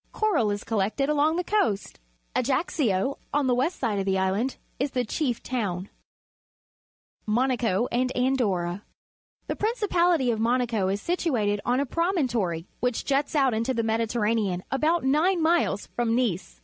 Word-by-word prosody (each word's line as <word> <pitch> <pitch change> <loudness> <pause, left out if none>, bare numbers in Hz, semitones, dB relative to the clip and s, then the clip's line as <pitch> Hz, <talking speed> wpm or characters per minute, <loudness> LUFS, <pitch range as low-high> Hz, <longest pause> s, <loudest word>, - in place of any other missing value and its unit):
Coral 415 - +1
is 205 0 -2
collected 225 +6 0
along 300 +2 +2
the 360 - 0
coast. 340 - 0 0.4
Ajaccio, 260 - 0
on 290 -1 +1
the 255 - +3
west 265 +9 0
side 220 -6 0
of 195 - -2
the 190 -1 +1
island, 195 +7 0 0.2
is 275 +3 0
the 250 -1 -1
chief 245 +1 -2
towni. 200 -7 -3 1.4
Monaco 235 -2 +1
and 255 +1 +1
Andorra. 205 -9 0 0.3
— - - -49
The - - -2
principality 355 - +2
of 220 - -2
Monaco 230 -3 +1
is 195 +1 0
situated 235 - 0
on 250 +1 +2
a 280 - +1
promontory, 245 - -1
which 245 -1 -1
juts 280 +2 0
out 270 -4 +3
into 230 +4 -1
the 230 - 0
^Mediterranean 220 -4 0
about 315 +5 +1
nine 315 +7 +2
miles 320 - +2
from 235 -1 +1
Nice. 220 -8 -1
245 Hz, 150 wpm, -26 LUFS, 210-285 Hz, 1.4 s, the